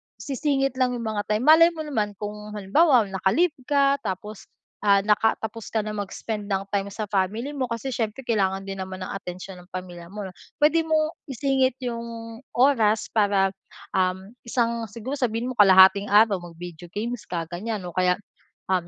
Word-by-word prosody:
sisingit 275 -2 -1
lang 250 -1 +2
yung 235 - -5
mga 205 -1 -3
time. 215 +2 0
Malay 330 +3 +7
mo 315 - -4
naman 215 -9 -2
kung 210 +1 -7
halimbawa, 240 - +4
naka-leave 195 - +1 0.2
ka 280 -1 +3
tapos, 210 -2 -6 0.3
ah, 200 -1 +4
naka 215 +2 +3
tapos 220 0 -5
ka 220 -1 -1
na 215 - -4
mag-spend 210 +1 -5
ng 195 -1 -1
time 200 -1 0
sa 205 +2 -5
family 210 +7 0
mo 270 -3 -2
kasi 235 +3 -4
siyempre 225 +2 -3
kailangan 195 -5 0
din 195 0 -6
naman 185 0 -5
ng - - -6
atensyon 185 -1 -7
ng 180 - -16
pamilya 175 -2 -7
mo 205 +3 -7
'no. 190 - -7 0.2
Puwede 315 +2 +3
mong 310 0 +1
isingit 265 -1 +1
yung 230 -1 -6 0.2
oras 230 -5 +3
para, 200 -3 +2 0.4
um, 190 +2 -1 0.2
isang 235 -1 0
siguro 235 +7 -6
sabihin 240 0 -1
mo - - -4
kalahating 195 0 +7
araw 205 -1 +5
mag-video 175 0 -10
games 235 +2 -4
ka, 170 -2 -2
ganyan 205 +3 -4
o 175 - -6
kaya, 180 +1 +2 0.6
um, 180 -2 +1
215 Hz, 175 wpm, -24 LUFS, 195-250 Hz, 0.6 s, Malay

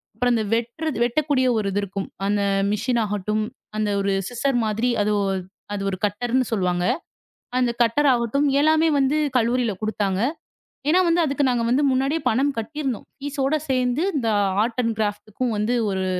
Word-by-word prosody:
அப்புறம் 245 -1 +2
அந்த 220 - +1
வெட்டுற 235 +7 -2 0.2
வெட்டக்கூடிய 260 +1 +1
ஒரு 210 - -1
இது 200 - 0
இருக்கும். 195 0 -4 0.2
அந்த 205 +1 +1 0.3
மெஷின் 235 +3 0
ஆகட்டும். 210 +1 -1 0.3
அந்த 215 -1 0
ஒரு 195 0 0 0.2
சிஸ்சர் 245 +1 0
மாதிரி. 220 +3 0
அது 210 - +1 0.6
அது 200 - -3
ஒரு 185 - -3
கட்டர்ன்னு 245 +5 0
சொல்லுவாங்க. 180 -4 0 0.7
அந்த 245 -2 +2
கட்டர் 275 +5 +2
ஆகட்டும். 245 +5 +1
எல்லாமே 315 +2 +4
வந்து 275 +2 +2 0.2
கல்லூரியில 235 -1 +2
குடுத்தாங்க. 205 -3 -1 0.7
ஏன்னா 360 +4 +5
வந்து 335 +1 +3
அதுக்கு 285 0 0
நாங்க 240 -2 +1
வந்து 270 +4 +3
முன்னாடியே 270 +5 0
பணம் 270 +5 +1
கட்டி 260 +8 -5
இருந்தோம். 260 -6 -3 0.2
பீஸ் 285 0 -5
ஓட 280 +3 +2
சேர்ந்து 255 +3 +1
இந்த 240 -5 0 0.3
ஆர்ட் 235 +2 -3
அண்ட் 225 -1 0
க்ராஃப்ட்க்கும் 215 +3 -2
வந்து 215 +4 0 0.2
ஒரு 190 -1 -1
240 Hz, 165 wpm, -23 LUFS, 210-270 Hz, 0.7 s, ஏன்னா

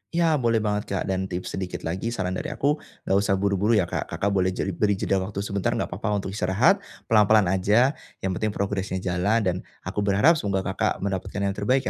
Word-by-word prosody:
Ya 165 -3 +3
boleh 115 -3 +2
banget 105 -1 -1
Kak, 100 -2 -1
dan 95 0 -2
tips 90 -1 -5
sedikit 95 -1 -5
lagi 95 +8 -3
saran 95 -3 -2
dari 95 - -3
aku, 145 +2 0 0.2
nggak 95 - +2
usah 100 -1 +1
buru-buru 100 +3 +2
ya 105 - +4
Kak, 85 - -3
Kakak 100 - -1
boleh 95 -1 +1
jeli 95 - -1
beri 100 +3 +1
jeda 95 0 0
waktu 100 +1 -4
sebentar, 100 -2 -1
nggak - - -2
apa-apa 105 +3 -1
untuk 95 - -4
istirahat. 95 -1 +3 0.3
Pelan-pelan 110 -1 +6
aja, 105 +8 +3 0.3
yang 95 - 0
penting 105 +3 -2
progresnya 95 -2 -2
jalan 95 +5 +1
dan, 90 -3 +1 0.3
aku - - -4
berharap 105 +12 +4
semoga 95 -4 -1
Kakak - - -1
mendapatkan 100 0 -3
yang 100 - +1
terbaik 115 +7 +1
100 Hz, 205 wpm, -25 LUFS, 95-110 Hz, 0.3 s, Pelan-pelan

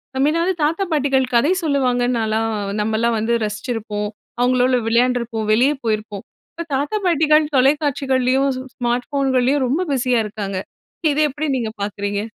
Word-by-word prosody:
நம்ம 270 +2 +2
எதாவது 340 +3 +1
தாத்தா 330 +6 +1
பாட்டிகள் 270 -3 +1
கதை 280 +8 +4
சொல்லுவாங்கனு 250 -4 +1
நான்லாம் 225 0 0 0.3
நம்மலாம் 220 +2 0
வந்து 225 +2 0
ரசிச்சிருப்போம். 210 -1 -4 0.3
அவுங்களோட 255 +1 +3
விளையாண்டுருப்போம். 235 -2 +1
வெளிய 250 +6 +4
போயிருப்போம். 215 -2 -3 0.3
இப்ப 335 - -6
தாத்தா 285 +10 -1
பாட்டிகள் 310 -3 +4
தொலைக்காட்சிகள்லயும், 270 -1 +2
ஸ் - - -4
ஸ் - - -11
ஸ்மார்ட் 245 0 -1
ஃபோன் 275 -1 0
கள்ளியும் 260 +2 +2
ரொம்ப 285 +8 0
பிஸியா 250 -2 +1
இருக்காங்க. 200 -2 -4 0.5
இதை 295 - +1
எப்பிடி 295 +2 -3
நீங்க 225 -3 -3
பார்க்குறீங்க? 205 0 -3
250 Hz, 145 wpm, -20 LUFS, 225-280 Hz, 0.5 s, கதை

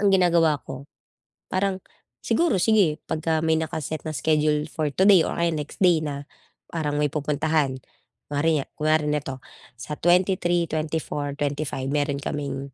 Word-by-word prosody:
Ang 200 -1 +4
ginagawa 170 -5 +4
ko 135 +1 -7 0.7
parang 190 0 +1 0.5
siguro 335 - +2
sige 185 -6 +3
'pagka 160 0 -1
may 160 0 +2
naka-set 155 -1 -4
na 155 - -3
schedule 150 +2 +1
for 155 -2 -1
today 190 +3 +5
or - - -3
kaya 170 0 +1
next 150 -1 -5
day 175 -3 +5
na 145 -2 -4 0.5
parang 150 -3 -2
may 150 -1 +1
pupuntahan, 150 -2 0 0.5
kunwari 145 0 +1
kunwari 155 0 +1
nito, 145 -3 -2 0.4
sa 130 +5 -6
23,24,25, 155 -6 0
mayroon 145 -1 0
kaming 140 -2 -4
155 Hz, 130 wpm, -24 LUFS, 145-170 Hz, 0.7 s, today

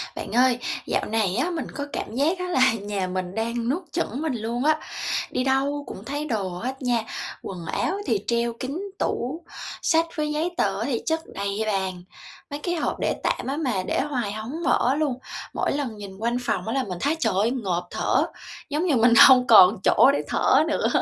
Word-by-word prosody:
Bạn - - -6
ơi, 250 0 +4 0.3
dạo - - 0
này 210 -4 0
á, 265 +10 +1
mình 335 -2 -3
có 285 - -4
cảm 225 - -4
giác 320 +7 +1
á 360 - -2
là 260 -7 +4
nhà 200 -2 -2
mình 185 0 -4
đang 230 +1 -1
nuốt 340 +7 -1
chửng 290 -6 -2
mình 315 -3 -1
luôn 235 +2 -3
á, 310 +1 +3 0.5
đi 255 - 0
đâu 275 +2 +1
cũng 195 - -8
thấy 290 +4 -3
đồ 220 -9 -1
hết 250 +10 -5
nha, 240 -3 +1 0.4
quần 180 -3 -7
áo 385 - -1
thì 410 - 0
treo 235 0 +1
kín 260 +7 -5 0.2
tủ, 285 +8 -2 0.4
sách 325 0 +3
với 300 -1 -1
giấy 315 +4 -1
tờ 195 -1 +1
á 225 - -1
thì 245 -4 -1
chất 320 0 +1
đầy 200 0 -3
ra 215 - 0
bàn, 190 -2 -2 0.5
mấy 285 - -5
cái 350 +3 -2
hộp 330 - -2
để - - 0
tạm - - -1
á 275 +2 -2
mà 250 -12 -1
để - - +1
hoài 250 -8 -2
hổng 240 +10 -5
mở 255 +3 +3
luôn. 300 -3 0 0.4
Mỗi - - 0
lần 270 -6 -3
nhìn 200 -2 -9
quanh 235 +3 0
phòng 245 - -2
á 225 - -1
là 270 -1 +1
mình 185 -6 -5
thấy, 295 +3 +2
trời - - +1
ơi, 215 +4 +2
ngộp 185 -9 -2
thở, - - +1 0.4
giống 300 +4 0
như 315 -6 +3
mình 235 0 +5
hông 255 -2 +6
còn 205 -2 +8
chỗ 270 - +6
để - - 0
thở - - +3
nữa - - +1
250 Hz, 215 wpm, -24 LUFS, 215-290 Hz, 0.5 s, còn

